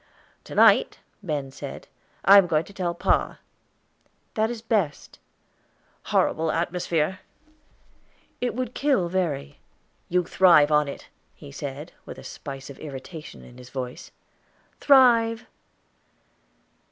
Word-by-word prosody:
"To - - -9
night," - - +5 0.2
Ben 150 -7 -3
said, - - -9 0.4
"I 200 +2 +9
am 190 - +2
going 155 -1 +1
to 200 - -15
tell 175 -3 -2
pa." - - 0 1.0
"That 220 0 +1
is 235 -2 -6
best." 205 -10 -2 0.9
"Horrible 160 0 +1
atmosphere!" 170 0 -1 1.2
"It 245 -2 -1
would 255 -1 -3
kill 270 -12 +1
Verry." 150 -6 -2 0.5
"You 180 +1 +2
thrive 170 -4 +5
in 150 -1 +3
it," 140 - -9 0.3
he - - -12
said, 145 - -7 0.2
with - - -8
a - - -11
spice 135 -1 -8
of 135 - -14
irritation 145 - -9
in 120 - -15
his 125 0 -12
voice. 125 -2 -6 0.7
"Thrive!" 235 -4 +4
170 Hz, 120 wpm, -25 LUFS, 145-200 Hz, 1.2 s, I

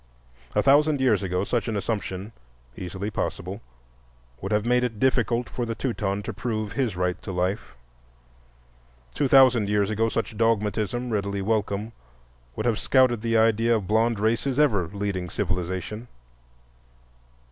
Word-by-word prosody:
A - - +3
thousand 145 +1 +4
years 125 -7 +3
ago 90 -1 -1
such 120 +4 -1
an 110 -2 -1
assumption, 100 -1 -3 0.4
easily 95 +3 -5
possible, 95 0 -4 0.8
would 95 - -4
have 105 +1 +1
made 125 +1 +3
it 115 -4 -3
difficult 125 -2 +1
for 125 - -4
the 115 -1 -3
Teuton 100 -6 -2
to 110 - -5
prove 110 0 -3
his 115 -2 -1
right 90 0 -1
to - - -6
life. 90 - -2 1.4
Two 140 - +1
thousand 125 -6 +5
years 105 0 +1
ago 115 +1 +1
such 115 0 -3
dogmatism, 115 +2 0
readily 100 -2 -1
welcome, 105 0 -1 0.6
would 110 - -3
have 115 -3 +1
scouted 130 -4 +3
the 115 0 +1
idea 115 +1 +3
of 105 -4 -2
blond 110 +2 +2
races 115 +5 0
ever 110 - +3
leading 100 -2 -3
civilization. 95 +4 -3
110 Hz, 145 wpm, -25 LUFS, 100-120 Hz, 1.4 s, thousand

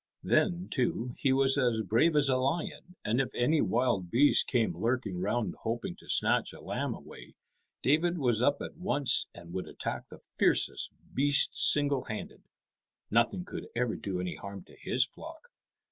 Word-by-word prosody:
Then, 180 -2 +1
too, 125 -2 -1
he 135 - +2
was 135 +1 +3
as 120 -4 +1
brave 115 - +2
as 145 -1 +4
a 130 - +3
lion, 155 +6 -3
and 115 +5 +2
if 130 - -3
any 150 +6 +2
wild 115 -7 0
beast 135 +9 +5
came 115 -9 0
lurking 110 -1 -2
round 105 +4 -1
hoping 115 +1 -4
to - - -17
snatch - - +2
a - - -12
lamb - - -3
away, - - -13 0.5
David 170 +6 +2
was 120 -7 +1
up 145 +3 +2
at - - -8
once 145 -7 +3
and 85 0 -13
would 95 - -4
attack - - -6
the - - -11
fiercest - - +1 0.2
beast 140 +1 +3
single 145 -3 +2
handed. 110 - -7 0.7
Nothing 120 - +1
could - - -7
ever 120 -1 0
do 95 -3 -4
any 90 -1 -3
harm 100 -1 -8
to - - -19
his 130 +1 +1
flock. 325 - -12
125 Hz, 170 wpm, -30 LUFS, 110-145 Hz, 0.7 s, beast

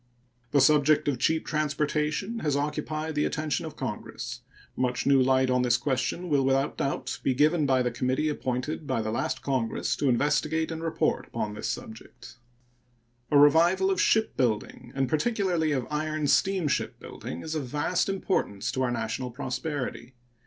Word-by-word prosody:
The 140 - +3
subject 150 +2 +4
of 135 -4 0
cheap 160 +5 +1
transportation 155 +7 -1
has 145 -6 0
occupied 155 +2 -2
the 150 0 +1
attention 155 +1 -2
of 155 - -9
Congress. 130 -7 -5 0.3
Much 125 -1 -1
new 140 -1 +5
light 130 0 +3
on 125 0 +3
this 120 -1 +3
question 130 +7 -1
will 145 -4 +2
without 135 +1 +1
doubt 135 - -2
be 130 - +1
given 150 +2 +3
by 130 -1 +3
the 125 - 0
committee 130 +5 0
appointed 145 +1 -3
by 125 -5 0
the 110 - -2
last 115 - -2
Congress 130 -5 -1
to 140 - +1
investigate 155 +5 +1
and 160 0 -5
report 165 -1 0
upon 105 - -3
this 105 - -4
subject. 115 +2 -8 0.9
A 145 - +4
revival 170 +6 +5
of 185 - +1
shipbuilding, 125 - 0
and 135 -1 +1
particularly 175 - +1
of 130 -4 0
iron 155 0 -1
steamship 165 -3 +1
building, 80 - -7
is 155 - -4
of 150 -5 -3
vast 150 +8 0
importance 120 - -1
to 130 - -2
our 130 - +1
national 120 +2 -3
prosperity. 130 -1 -4
145 Hz, 160 wpm, -27 LUFS, 125-155 Hz, 0.9 s, new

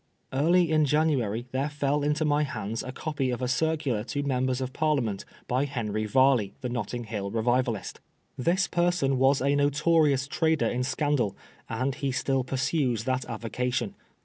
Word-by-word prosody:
Early 165 +5 +3
in 155 -1 +4
January 130 -7 +1
there 135 +3 -1
fell 145 0 0
into 150 +2 +1
my 145 0 +2
hands 115 -6 -3
a 130 - -6
copy 140 -1 -2
of 125 - -2
a 125 - -1
circular 140 -4 0
to 145 +3 -3
Members 130 -2 0
of 130 0 -4
Parliament 135 -11 0 0.2
by 130 +3 +1
Henry 110 -6 -2
Varley, 130 -4 +3
the 125 - -3
Netting 120 0 -3
Hill 105 -3 -4
revivalist. 115 -1 0 0.4
This 175 +8 +1
person 175 -7 +1
was 135 +1 +4
a 140 +1 +2
notorious 145 -1 +3
trader 160 +1 +1
in 125 - 0
scandal, 130 -4 0 0.3
and 130 +4 -1
he 140 0 -2
still 130 0 0
pursues 130 -3 0
that 130 0 -1
avocation. 120 0 -2
130 Hz, 160 wpm, -27 LUFS, 120-145 Hz, 0.4 s, in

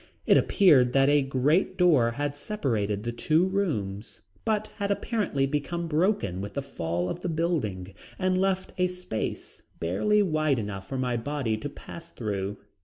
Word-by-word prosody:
It - - +5
appeared 135 - +5
that 135 0 +4
a 145 0 +5
great 140 +8 +1
door 150 -11 +4
had 145 +2 -2
separated 115 - -2
the 120 - -2
two 155 +8 +2
rooms, 115 - -2 0.2
but 215 -1 +1
had 200 -1 -2
apparently 200 - 0
become 150 +5 -2
broken 155 - 0
with 100 +1 -7
the 140 - -2
fall 85 -9 -3
of 170 - -4
the 180 - -2
building 135 - -1 0.2
and 185 0 +1
left 190 -1 0
a 180 - +4
space 180 -11 -5 0.2
barely 205 - +2
wide 155 -6 +1
enough 100 -3 -5
for 135 - -3
my 125 -2 0
body 125 -2 -1
to 130 +7 -5
pass 170 +3 -11
through. 100 -6 -3
145 Hz, 165 wpm, -27 LUFS, 110-180 Hz, 0.2 s, It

